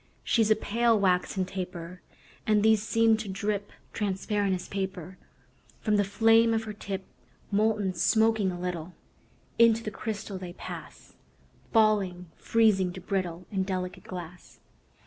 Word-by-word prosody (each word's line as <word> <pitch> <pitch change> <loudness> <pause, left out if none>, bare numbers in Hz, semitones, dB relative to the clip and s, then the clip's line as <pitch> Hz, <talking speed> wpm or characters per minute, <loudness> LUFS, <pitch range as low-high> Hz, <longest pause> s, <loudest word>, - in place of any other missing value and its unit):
She's 225 -2 +2
a 215 - +6
pale, 230 +1 +2
waxen 185 0 +1
taper; 180 -2 -6 0.5
And 210 -1 +3
these 220 -1 +5
seem 225 0 +3
to 220 -1 -6
drip 200 +1 -2 0.2
Transparent 200 -1 0
as 180 - -7
paper 190 -2 -5 0.6
From 210 -2 +1
the 205 - +3
flame 225 +3 +4
of 225 - -1
her 215 -1 -6
tip. 195 -2 -5 0.5
Molten, 210 -2 +1
smoking 220 +2 +2
a 175 - -6
little, 180 -1 -4 0.6
Into 230 -2 +4
crystal 205 -3 -5
they 180 -2 -7
pass; - - -9 0.6
Falling, 195 -6 +2
freezing, 210 -5 +2
to 185 - -7
brittle 180 -2 -3
And 190 -2 0
delicate 185 -1 -4
glass. 180 -1 -9
200 Hz, 135 wpm, -28 LUFS, 185-220 Hz, 0.6 s, a